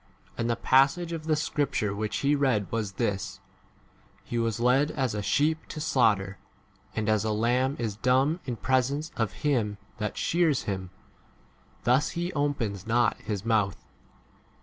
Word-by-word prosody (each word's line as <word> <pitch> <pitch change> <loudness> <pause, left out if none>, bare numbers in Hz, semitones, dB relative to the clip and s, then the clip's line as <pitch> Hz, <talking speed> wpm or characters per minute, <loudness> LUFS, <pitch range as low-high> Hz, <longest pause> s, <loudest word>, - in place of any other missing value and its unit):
And 115 - -1
the 120 - +2
passage 140 +8 +3
of 160 -2 -5
the 155 - +3
scripture 145 -9 -1
which 105 +1 -2
he 145 - +4
read 130 -9 +1
was 110 -4 -2
this: 100 -3 -2 0.8
He 120 - -3
was 115 -1 -1
led 130 +5 +3
as 130 -7 -1
a 105 - -2
sheep 155 +9 +1
to 155 - -7
slaughter, 105 - +2 0.6
and 110 -1 -1
as 110 -1 +2
a 110 - 0
lamb 125 +5 +1
is 110 -4 -3
dumb 135 +8 +2
in 125 -3 -3
presence 130 +6 0
of 115 -4 0
him 115 -8 +1 0.2
that 105 -1 -3
shears 165 -5 +2
him, 95 -2 -4 0.9
thus 130 +5 +3
he 175 +2 -2
opens 115 - -1
not 120 +1 +3
his 105 -1 -4
mouth. 105 -4 +1
120 Hz, 155 wpm, -27 LUFS, 105-145 Hz, 0.9 s, he